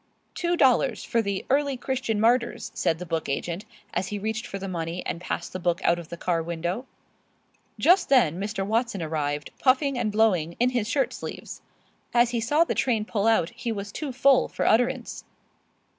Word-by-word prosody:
"Two 345 0 0
dollars, 260 -5 +3
for 230 - +1
the 200 -3 -3
'Early 280 -1 +2
Christian 250 -4 -2
Martyrs,'" 235 +2 +1
said 160 - 0
the 180 - -7
book 165 -2 -2
agent, 170 +8 -3 0.3
as 185 - -1
he 205 - -4
reached 220 +2 -3
for 195 - -5
the 195 0 -5
money 170 -1 -4
and 170 - -3
passed - - -4
the 185 - -4
book 175 -1 0
out 170 0 +3
of 170 - -10
the 170 - -7
car 170 -1 0
window. 170 +8 -3 0.9
Just 360 +1 +4
then 205 - +4
Mr. 200 -1 -2
Watson 225 -3 0
arrived, 150 -2 -2
puffing 265 0 +2
and 220 -3 0
blowing, 185 -7 +2
in 245 +1 +3
his 240 -4 -1
shirt 270 +2 +1
sleeves. - - -7 0.5
As 240 0 +4
he 240 - 0
saw 295 +8 +3
the 335 - -2
train 230 -2 +1
pull 215 -1 0
out 220 -7 +3
he 235 0 -4
was 205 -2 -5
too 295 +2 -4
full 265 +1 +4
for - - -3
utterance. 245 +2 +1
220 Hz, 190 wpm, -26 LUFS, 175-250 Hz, 0.9 s, Just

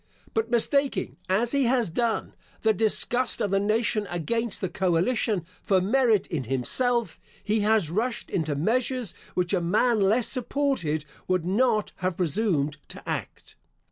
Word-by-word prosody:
But 225 +1 0
mistaking, 275 +4 +1
as 225 +6 +2
he 280 -2 +2
has 240 -6 +1
done, 230 +5 -1 0.3
the 220 0 +3
disgust 230 +4 +2
of 205 - -1
the 195 - +3
nation 215 +1 0
against 230 +6 -1
the 190 - -1
coalition, 185 +2 0 0.2
for 190 -2 +2
merit 220 +1 +2
in 145 -6 -4
himself, 235 - +1 0.2
he 215 +1 +1
has 210 -6 +2
rushed 230 +6 -2
into 155 -5 -1
measures 235 - 0 0.2
which 180 +1 0
a 185 - +2
man 215 +7 +2
less 215 +5 +3
supported 250 - -1 0.2
would 185 -2 0
not 215 +2 +1
have 185 -2 -2
presumed 160 -4 0
to - - -9
act. - - -5
215 Hz, 145 wpm, -26 LUFS, 180-240 Hz, 0.3 s, the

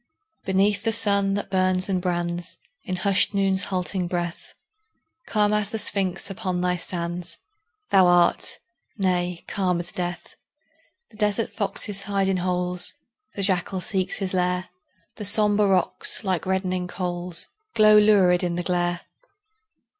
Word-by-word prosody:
Beneath 200 +1 +2
the 225 0 0
sun 200 -3 +2
that 205 - -4
burns 185 -1 +1
and 185 -2 -1
brands 175 -1 -3 0.3
In 185 -4 -3
hushed 190 +1 +2
Noon's 195 -1 +1
halting 185 -1 -2
breath, 175 -1 -5 0.7
Calm 210 -1 +2
as 210 -1 0
the 220 - -3
Sphinx 195 -4 +1
upon 185 -3 -3
thy 180 0 0
sands 175 -1 -3 0.5
Thou 190 -2 +6
art 175 -1 +3 0.4
nay, 180 -3 -1
calm 180 -3 0
as 175 +1 -3
death. 175 -1 -5 0.8
The 215 - -17
desert 210 +1 0
foxes 205 -1 -1
hide 195 -1 -1
in 190 - +1
holes, 180 0 0 0.4
The 200 - -1
jackal 185 0 +1
seeks 190 -1 -2
his 195 -2 -3
lair; 180 0 0 0.5
The 210 - -4
sombre 210 0 +3
rocks, 190 +2 +1
like 185 -3 -1
reddening 185 -1 -1
coals, 175 -1 -2 0.3
Glow 215 -1 +6
lurid 195 -4 +4
in 175 -1 -1
the 175 - -2
glare. 175 -1 -1
185 Hz, 140 wpm, -24 LUFS, 180-200 Hz, 0.8 s, Thou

